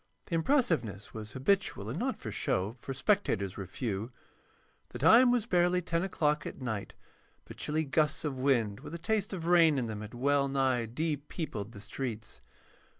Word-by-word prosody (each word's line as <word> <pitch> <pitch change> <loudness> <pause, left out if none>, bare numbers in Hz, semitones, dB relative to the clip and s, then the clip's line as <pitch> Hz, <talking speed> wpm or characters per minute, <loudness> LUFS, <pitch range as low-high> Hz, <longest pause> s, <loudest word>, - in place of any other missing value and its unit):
The - - -8
impressiveness 160 - +1
was 105 -1 -7
habitual 135 - 0
and 125 +8 -3
not 260 +3 -1
for 110 - -6
show, 95 +2 -1
for 135 - -7
spectators 135 - +1
were 95 -2 -6
few. 110 +1 -3 0.8
The - - -7
time 245 +2 +7
was 245 -3 +2
barely 180 -3 +3
10 170 -1 -1
o'clock 150 -5 0
at - - -8
night, 110 -6 -4 0.5
but - - -11
chilly 155 +1 -1
gusts 150 +1 +1
of 135 -3 -3
wind 120 -7 +1
with 165 - -8
a - - -3
taste 205 +4 -1
of 175 -4 -4
rain 165 -4 +5
in 125 - 0
them 110 -2 -5
had 105 +2 -8
well 140 +2 +2
nigh 130 -4 +1
de 150 +6 -1
peopled 140 - -5
the 100 - -9
streets. 110 - -6
140 Hz, 180 wpm, -31 LUFS, 110-170 Hz, 0.8 s, time